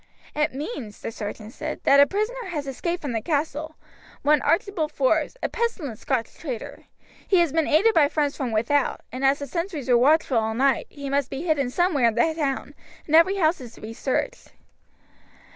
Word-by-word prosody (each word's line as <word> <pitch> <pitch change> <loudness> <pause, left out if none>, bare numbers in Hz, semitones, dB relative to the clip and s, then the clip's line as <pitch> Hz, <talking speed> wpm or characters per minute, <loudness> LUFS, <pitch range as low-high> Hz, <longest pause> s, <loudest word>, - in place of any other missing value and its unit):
"It 300 -3 0
means," 270 - -6
the - - -4
sergeant 215 +1 -7
said, - - -5
"that 280 0 +6
a 285 - +7
prisoner 440 - -2
has 305 -6 -4
escaped 340 +6 -3
from 285 - -3
the 225 -2 -1
castle, 310 +2 -2 0.5
one 295 0 +4
Archibald 335 -2 0
Forbes, 305 - +1
a - - +2
pestilent 390 - -3
Scotch 250 -5 -2
traitor. 255 -9 -6 0.4
He 385 - +4
has 340 -5 +3
been 320 -1 +2
aided 405 +10 +4
by 305 -6 +5
friends 290 -2 0
from 255 -4 -3
without, 235 +6 +1
and 255 +2 -5
as 270 +1 +4
the 285 - -5
sentries 335 -1 -4
were 245 - +6
watchful 275 -2 +3
all 220 0 -2
night, 265 +1 +2
he 280 -1 -8
must 275 -1 0
be 270 +4 -5
hidden 300 -7 +1
somewhere 300 -4 +2
in 225 - 0
the 315 +7 +2
town, 280 -4 -2 0.3
and 310 - +2
every 335 +4 +6
house 330 -5 +1
is 240 -2 -10
to - - -15
be 220 +1 -7
searched." 385 - -2
290 Hz, 195 wpm, -24 LUFS, 255-330 Hz, 0.5 s, a